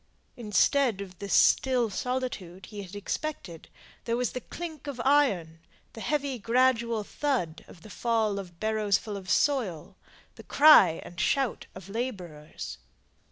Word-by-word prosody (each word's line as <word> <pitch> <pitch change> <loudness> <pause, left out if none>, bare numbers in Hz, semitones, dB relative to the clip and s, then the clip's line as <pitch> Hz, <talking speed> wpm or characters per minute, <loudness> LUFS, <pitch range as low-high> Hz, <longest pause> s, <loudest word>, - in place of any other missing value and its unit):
Instead 235 +1 +2
of 185 -2 -9
the 200 - -6
still 250 -2 +3
solitude 225 -7 -4
he 210 -2 -8
had 195 0 -10
expected, 205 - -5 0.4
there 235 0 0
was 250 -1 -1
the 250 - -5
clink 320 -2 -8
of 275 -4 -5
iron, 200 - +2 0.3
the 225 - -9
heavy 280 -3 -1
gradual 235 -1 +2
thud 205 - -2
of 165 - -16
the 215 - -12
fall 220 -4 0
of 175 -3 -10
barrows 215 -2 +1
ful 210 0 -7
of 190 -2 -8
soil 205 - 0 0.4
the - - -11
cry 295 - +6
and 175 +2 -6
shout 270 -4 0
of 190 0 -10
labourers. 190 -9 -6
220 Hz, 145 wpm, -28 LUFS, 190-260 Hz, 0.4 s, cry